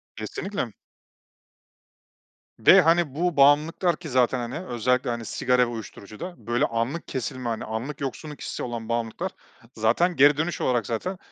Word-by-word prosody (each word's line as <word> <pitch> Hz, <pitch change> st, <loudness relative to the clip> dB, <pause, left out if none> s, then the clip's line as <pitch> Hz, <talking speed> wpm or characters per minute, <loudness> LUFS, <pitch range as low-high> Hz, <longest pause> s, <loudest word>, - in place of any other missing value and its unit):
Kesinlikle. 125 Hz, -, -4 dB, 1.9 s
Ve, -, -, +8 dB
hani, 165 Hz, -3 st, +2 dB
bu 175 Hz, 0 st, 0 dB
bağımlılıklar 150 Hz, +5 st, +4 dB
ki 160 Hz, -1 st, -9 dB
zaten, 125 Hz, -1 st, +2 dB
hani, 125 Hz, +9 st, -5 dB
özellikle, 125 Hz, +1 st, 0 dB
hani, 120 Hz, -1 st, -3 dB
sigara 125 Hz, +4 st, +1 dB
ve -, -, +5 dB
uyuşturucuda 115 Hz, -, -8 dB
böyle 120 Hz, +1 st, +2 dB
anlık 115 Hz, +8 st, -2 dB
kesilme, 130 Hz, -1 st, -4 dB
hani, 115 Hz, -, -3 dB
anlık 120 Hz, +7 st, -5 dB
yoksunluk 145 Hz, +2 st, -5 dB
hissi -, -, -5 dB
olan 115 Hz, -2 st, -5 dB
bağımlılıklar 115 Hz, +11 st, -2 dB, 0.4 s
zaten 120 Hz, +12 st, +2 dB
geri 145 Hz, 0 st, +6 dB
dönüş 165 Hz, +2 st, -2 dB
olarak 120 Hz, -4 st, +1 dB
zaten 180 Hz, +12 st, -3 dB
130 Hz, 145 wpm, -25 LUFS, 115-160 Hz, 1.9 s, Ve